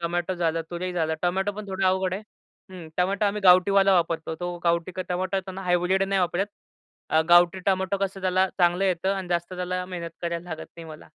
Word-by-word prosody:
Tomato 175 Hz, +2 st, -1 dB
झालं, 165 Hz, -1 st, 0 dB
तुरी 180 Hz, +1 st, -4 dB
झालं, 160 Hz, -2 st, 0 dB
टोमॅटो 190 Hz, +3 st, 0 dB
पण 210 Hz, +1 st, -8 dB
थोडं 190 Hz, 0 st, -2 dB
अवघड 185 Hz, 0 st, +1 dB
आहे. 200 Hz, -, -5 dB, 0.5 s
हं. 175 Hz, -4 st, -9 dB
टोमॅटो 195 Hz, +4 st, +1 dB
आम्ही 210 Hz, +1 st, -1 dB
गावठीवाला 195 Hz, +2 st, +6 dB
वापरतो. 165 Hz, -2 st, 0 dB
तो 175 Hz, 0 st, -3 dB
गावठी 170 Hz, +1 st, +1 dB
का 185 Hz, -, -4 dB
टोमॅटो 185 Hz, +2 st, -1 dB
त्यांना 190 Hz, +1 st, -8 dB
हायब्रिड 180 Hz, +1 st, +2 dB
नाही 195 Hz, 0 st, +1 dB
वापरत. 180 Hz, +3 st, 0 dB, 0.6 s
अ, 160 Hz, -, +4 dB
गावठी 175 Hz, +2 st, +6 dB
टोमॅटो 190 Hz, 0 st, +1 dB
कसं 195 Hz, 0 st, -3 dB
त्याला 185 Hz, 0 st, +2 dB
चांगलं 175 Hz, +2 st, +3 dB
येतं 190 Hz, +1 st, +1 dB
आणि 190 Hz, -2 st, -5 dB
जास्त 175 Hz, +1 st, -1 dB
त्याला 180 Hz, 0 st, -3 dB
मेहनत 170 Hz, -2 st, -6 dB
करायला 170 Hz, +1 st, -3 dB
लागत 160 Hz, -, -6 dB
नाही 165 Hz, -, -9 dB
मला. 155 Hz, -1 st, -11 dB
180 Hz, 200 wpm, -25 LUFS, 175-190 Hz, 0.6 s, गावठीवाला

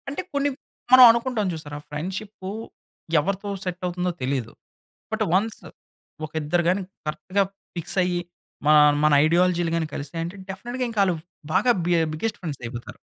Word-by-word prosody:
అంటే 280 Hz, -, -3 dB
కొన్ని 285 Hz, 0 st, +1 dB, 0.4 s
మనం 255 Hz, 0 st, +11 dB
అనుకుంటాం 235 Hz, -3 st, -1 dB
చూసారా 150 Hz, -2 st, -7 dB
ఫ్రెండ్‌షిప్పు 190 Hz, +6 st, -5 dB, 0.7 s
ఎవరితో 195 Hz, +6 st, -2 dB
సెట్ 180 Hz, -1 st, -4 dB
అవుతుందో 180 Hz, 0 st, -1 dB
తెలీదు. 130 Hz, -3 st, -1 dB, 0.6 s
బట్ -, -, 0 dB
వన్స్ 210 Hz, +4 st, +1 dB, 0.6 s
ఒక 155 Hz, -, -12 dB
ఇద్దరు 175 Hz, +4 st, +1 dB
గాని 190 Hz, +2 st, +1 dB, 0.3 s
కరెక్ట్‌గా 185 Hz, +6 st, 0 dB, 0.3 s
ఫిక్స్ 170 Hz, +2 st, -3 dB
అయ్యి. 175 Hz, -1 st, 0 dB, 0.4 s
మా 150 Hz, -, +6 dB, 0.3 s
మన 150 Hz, -1 st, +5 dB
ఐడియాలజీలు 175 Hz, 0 st, +2 dB
గాని 165 Hz, -1 st, 0 dB
కలిసియంటే 165 Hz, +5 st, -4 dB
డెఫినిట్‌గా 240 Hz, +7 st, -4 dB
ఇంకా 220 Hz, -3 st, 0 dB
ఆళ్ళు 185 Hz, -3 st, +1 dB, 0.4 s
బాగా 250 Hz, -, +4 dB
బి 175 Hz, -, +2 dB
ఆహ్, 160 Hz, -, +1 dB
బిగ్గెస్ట్ 210 Hz, +8 st, -2 dB
ఫ్రెండ్స్ 155 Hz, -7 st, -5 dB
అయిపోతారు. 120 Hz, 0 st, -7 dB
180 Hz, 145 wpm, -24 LUFS, 155-200 Hz, 0.7 s, మనం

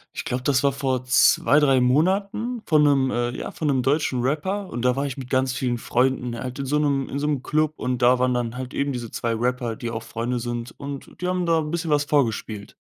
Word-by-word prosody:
Ich -, -, -5 dB
glaube, 125 Hz, +1 st, -2 dB
das 135 Hz, -1 st, +2 dB
war 140 Hz, -2 st, +2 dB
vor 130 Hz, -2 st, -1 dB
2, 130 Hz, +2 st, +4 dB
3 135 Hz, -3 st, +4 dB
Monaten 195 Hz, -, +1 dB
von 155 Hz, -2 st, +4 dB
'nem, 135 Hz, -3 st, +3 dB
äh, 120 Hz, 0 st, 0 dB
ja 125 Hz, -, -6 dB
von 155 Hz, -, -3 dB
'nem 130 Hz, -2 st, +2 dB
deutschen 135 Hz, -1 st, +1 dB
Rapper 185 Hz, +9 st, -1 dB
und 120 Hz, -, -5 dB
da 125 Hz, +1 st, +2 dB
war 140 Hz, -, 0 dB
ich 135 Hz, -, -4 dB
mit 130 Hz, -2 st, -7 dB
ganz 130 Hz, 0 st, +1 dB
vielen 125 Hz, -2 st, -1 dB
Freunden, 125 Hz, +1 st, 0 dB
er 120 Hz, -, -5 dB
hat 130 Hz, +2 st, -6 dB
in 140 Hz, -, -2 dB
so 145 Hz, +3 st, +1 dB
'nem 140 Hz, -2 st, +1 dB
in 140 Hz, -, -4 dB
so 150 Hz, -, -1 dB
'm 145 Hz, -4 st, 0 dB
Club 155 Hz, +2 st, 0 dB
und 125 Hz, -1 st, -2 dB
da 125 Hz, +1 st, +5 dB
waren 125 Hz, 0 st, +2 dB
dann 120 Hz, -1 st, -2 dB
halt 130 Hz, 0 st, -6 dB
eben 140 Hz, 0 st, -1 dB
diese 120 Hz, -3 st, -5 dB
2 115 Hz, -1 st, -2 dB
Rapper, 120 Hz, 0 st, -1 dB
die 120 Hz, -, -4 dB
auch 115 Hz, 0 st, -5 dB
Freunde 120 Hz, +2 st, -3 dB
sind 120 Hz, 0 st, -4 dB
und 140 Hz, +2 st, -8 dB
die 180 Hz, -, -1 dB
haben 180 Hz, -1 st, 0 dB
da 165 Hz, -1 st, +3 dB
'n 150 Hz, -1 st, -3 dB
bisschen 170 Hz, -1 st, -2 dB
was 145 Hz, 0 st, +3 dB
vorgespielt. 115 Hz, -8 st, -1 dB
130 Hz, 250 wpm, -23 LUFS, 125-150 Hz, -, da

